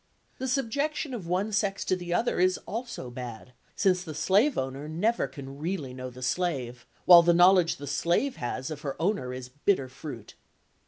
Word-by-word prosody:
The 260 - -2
subjection 275 +3 -1
of 205 -8 -6
one 190 +5 0
sex 200 -2 0
to 185 - +2
the 175 -1 -6
other 225 +5 +1
is 185 0 +3
also 230 - -5
bad, 125 0 -8 0.2
since 185 -3 +2
the 155 -4 -7
slave 200 - +3
owner 135 +3 -3
never 210 +9 0
can 140 -2 -10
really 155 -5 -3
know 130 0 -6
the 125 +1 -10
slave, 125 -6 -2 0.2
while 175 -1 +10
the 170 0 +3
knowledge 180 -1 +5
the 145 - -8
slave 170 - 0
has 130 +4 -4
of 150 -1 -6
her 140 -2 -5
owner 165 -8 0
is 125 0 -7
bitter 140 0 0
fruit. 130 -4 -9
170 Hz, 180 wpm, -28 LUFS, 130-195 Hz, 0.2 s, while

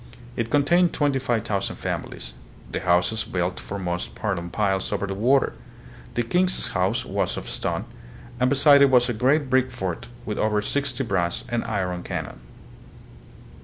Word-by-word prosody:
It 115 -1 -2
contained 170 +6 +3
twenty 145 -3 +1
five 120 -4 -1
thousand 100 -3 -1
families, - - -5 0.4
the - - -2
houses 90 +5 +2
built 90 0 -2
for 100 - -6
most 90 -2 -3
part 105 -5 -1
on 85 0 -6
piles 95 -1 0
over - - -1
the 95 - -3
water. 125 +7 +3 0.6
The 120 - +1
king's 180 +9 +1
house - - 0
was - - -1
of - - -6
stone, - - -2 0.5
and 125 0 +3
beside 140 +1 +6
it 140 - +7
was 125 -1 +4
a - - +1
great 135 +6 +2
brick 130 0 +3
fort, 95 -9 -4 0.2
with 105 - -3
over 105 -1 +2
sixty 140 +2 -1
brass 90 -6 -1
and 120 0 0
iron 95 -5 -2
cannon. - - -5
115 Hz, 165 wpm, -24 LUFS, 95-135 Hz, 0.6 s, it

